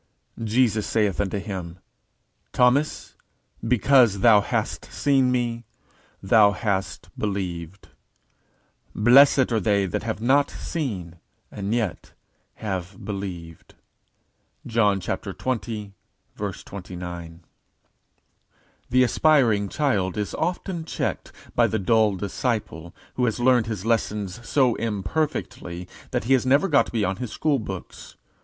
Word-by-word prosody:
_Jesus 115 Hz, -1 st, +1 dB
saith 105 Hz, -6 st, +1 dB
unto 100 Hz, 0 st, -2 dB
him, 95 Hz, -4 st, -6 dB, 0.8 s
Thomas, 130 Hz, +5 st, +2 dB, 0.5 s
because 120 Hz, -3 st, +4 dB
thou 110 Hz, -2 st, +7 dB
hast -, -, -2 dB
seen 135 Hz, -3 st, +2 dB
me, 120 Hz, -2 st, -1 dB, 0.6 s
thou 105 Hz, +1 st, +5 dB
hast 100 Hz, -3 st, -3 dB
believed: 95 Hz, -3 st, -4 dB, 1.1 s
blessed 130 Hz, +3 st, +6 dB
are 115 Hz, -, +2 dB
they 100 Hz, 0 st, +2 dB
that 90 Hz, -, -2 dB
have 110 Hz, -1 st, -3 dB
not 135 Hz, +5 st, +3 dB
seen, 95 Hz, -, -5 dB, 0.3 s
and 100 Hz, 0 st, -4 dB
yet 110 Hz, -6 st, -2 dB, 0.4 s
have 95 Hz, -2 st, -5 dB
believed._ 90 Hz, -5 st, -7 dB, 0.9 s
JOHN 105 Hz, -4 st, +2 dB
xx. 110 Hz, 0 st, -4 dB, 0.8 s
29. 90 Hz, -3 st, -8 dB, 1.5 s
The 130 Hz, +1 st, +4 dB
aspiring 120 Hz, -7 st, +3 dB
child 105 Hz, -, 0 dB
is 105 Hz, -1 st, -3 dB
often 175 Hz, 0 st, -2 dB
checked 160 Hz, -, -3 dB, 0.2 s
by -, -, +4 dB
the 110 Hz, -, -1 dB
dull 110 Hz, 0 st, +2 dB
disciple 100 Hz, -4 st, -3 dB, 0.2 s
who 125 Hz, -, 0 dB
has 115 Hz, 0 st, -1 dB
learned 120 Hz, -2 st, +3 dB
his 105 Hz, -3 st, -4 dB
lessons 110 Hz, -1 st, -2 dB
so 130 Hz, -4 st, +3 dB
imperfectly 100 Hz, -, -3 dB, 0.2 s
that -, -, -1 dB
he 130 Hz, +5 st, +2 dB
has 130 Hz, -, +3 dB
never 140 Hz, +8 st, +4 dB
got 145 Hz, -5 st, +3 dB
beyond 100 Hz, -5 st, -1 dB
his 125 Hz, -4 st, -5 dB
school 150 Hz, -3 st, 0 dB
books. 95 Hz, -4 st, -8 dB
110 Hz, 110 wpm, -24 LUFS, 95-125 Hz, 1.5 s, thou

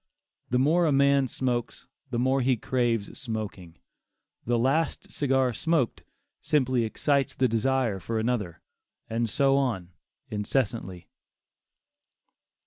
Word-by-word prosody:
The 125 Hz, -, +2 dB
more 160 Hz, +6 st, +3 dB
a -, -, +2 dB
man 140 Hz, -1 st, +4 dB
smokes, 120 Hz, -2 st, -3 dB, 0.2 s
the 120 Hz, -, -2 dB
more 130 Hz, +2 st, +2 dB
he 130 Hz, 0 st, +2 dB
craves 120 Hz, -3 st, -1 dB
smoking; 105 Hz, -, -5 dB, 0.7 s
the 120 Hz, +1 st, +1 dB
last 140 Hz, +7 st, 0 dB
cigar 130 Hz, -3 st, +1 dB
smoked, 155 Hz, -2 st, 0 dB, 0.4 s
simply 130 Hz, -5 st, +1 dB
excites 140 Hz, +4 st, 0 dB
the 130 Hz, -, +3 dB
desire 115 Hz, -2 st, 0 dB
for 110 Hz, +5 st, -3 dB
another, 110 Hz, -7 st, -2 dB, 0.5 s
and 115 Hz, 0 st, 0 dB
so 135 Hz, +4 st, +3 dB
on 110 Hz, -10 st, -1 dB, 0.4 s
incessantly. 105 Hz, -4 st, -2 dB
125 Hz, 115 wpm, -27 LUFS, 110-135 Hz, 0.7 s, man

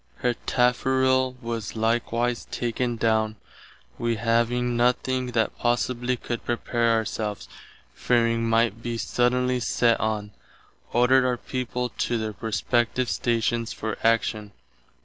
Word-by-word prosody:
Her 125 Hz, -1 st, 0 dB
tafferill 130 Hz, +1 st, +2 dB
was 115 Hz, -2 st, -4 dB
likewise 115 Hz, +1 st, 0 dB
taken 120 Hz, 0 st, -2 dB
downe. 110 Hz, -1 st, +1 dB, 0.6 s
Wee 120 Hz, 0 st, 0 dB
having 120 Hz, +2 st, +1 dB
done 120 Hz, +1 st, +4 dB, 0.3 s
what 115 Hz, -3 st, 0 dB
possibly 125 Hz, +1 st, 0 dB
could 120 Hz, -1 st, -4 dB
to -, -, -28 dB
prepare 120 Hz, 0 st, +1 dB
ourselves, 110 Hz, -2 st, -2 dB, 0.5 s
fearing 115 Hz, -1 st, +1 dB
might 115 Hz, -1 st, +2 dB
be 120 Hz, -1 st, -3 dB
suddenly 125 Hz, +2 st, +1 dB
sett 115 Hz, 0 st, +2 dB
on, 105 Hz, -1 st, -2 dB, 0.6 s
ordered 125 Hz, +2 st, +4 dB
our 125 Hz, -1 st, +1 dB
people 125 Hz, 0 st, -3 dB
to 120 Hz, -, -1 dB
their 110 Hz, -1 st, -3 dB
respective 120 Hz, +3 st, 0 dB
stations 115 Hz, -1 st, 0 dB
for 110 Hz, -, -4 dB
action. 110 Hz, -2 st, +1 dB
120 Hz, 120 wpm, -25 LUFS, 115-125 Hz, 0.6 s, done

